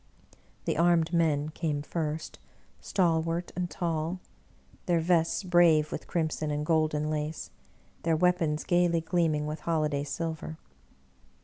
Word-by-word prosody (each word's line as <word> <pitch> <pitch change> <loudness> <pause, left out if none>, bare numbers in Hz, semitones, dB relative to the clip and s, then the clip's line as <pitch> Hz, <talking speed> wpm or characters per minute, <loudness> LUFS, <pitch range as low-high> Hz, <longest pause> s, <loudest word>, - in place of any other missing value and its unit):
The - - 0
armed 170 0 +3
men 155 -3 +2
came 155 -2 -2
first, 155 0 -4 0.4
stalwart 165 -1 0
and 180 -1 -2
tall, 165 +1 -2 0.7
their 175 -2 +3
vests 165 +3 +2
brave 170 -4 +4
with - - -5
crimson 155 -2 -1
and 150 0 -2
golden 155 -2 +1
lace, 150 0 -3 0.5
their 165 -1 +2
weapons 165 -3 +1
gayly 175 -1 +2
gleaming 160 -3 +1
with 150 +1 -4
holiday 150 -3 0
silver. 160 +1 -4
160 Hz, 120 wpm, -29 LUFS, 155-170 Hz, 0.7 s, brave